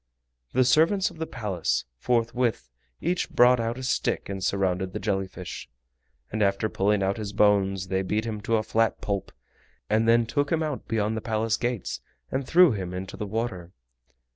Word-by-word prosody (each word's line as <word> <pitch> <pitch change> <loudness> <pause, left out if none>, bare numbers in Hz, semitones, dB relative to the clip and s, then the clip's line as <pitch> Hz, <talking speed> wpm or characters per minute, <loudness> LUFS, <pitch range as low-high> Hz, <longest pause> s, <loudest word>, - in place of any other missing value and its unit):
The 130 0 +4
servants 165 +9 +3
of 160 - -14
the 160 - -3
Palace 100 -7 -2
forthwith 115 - 0 0.3
each 175 +2 -1
brought 125 0 +5
out 115 +1 -2
a 130 - -6
stick 130 - -1
and 95 -1 -4
surrounded 95 -1 0
the - - -3
jelly 95 -2 -1
fish, 90 -1 -8 0.6
and 110 - -2
after 100 +2 +2
pulling 100 0 +1
out 95 +1 0
his 105 -2 -5
bones 100 -2 +2
they 95 0 +1
beat 105 +4 -1
him 110 -2 -4
to 115 +1 +1
a 110 - -1
flat 115 +1 +1
pulp, 100 -2 -3 0.6
and 110 +1 +3
then 115 0 +5
took 145 +5 -1
him 165 -1 +2
out 150 -4 -4
beyond 110 -1 0
the 110 - -3
Palace 110 -1 0
gates 120 -3 -3 0.3
and 135 -1 -2
threw 180 -2 +6
him 95 -4 -4
into 95 +1 -6
the 105 - -5
water. 100 -5 -4
110 Hz, 185 wpm, -26 LUFS, 95-120 Hz, 0.6 s, threw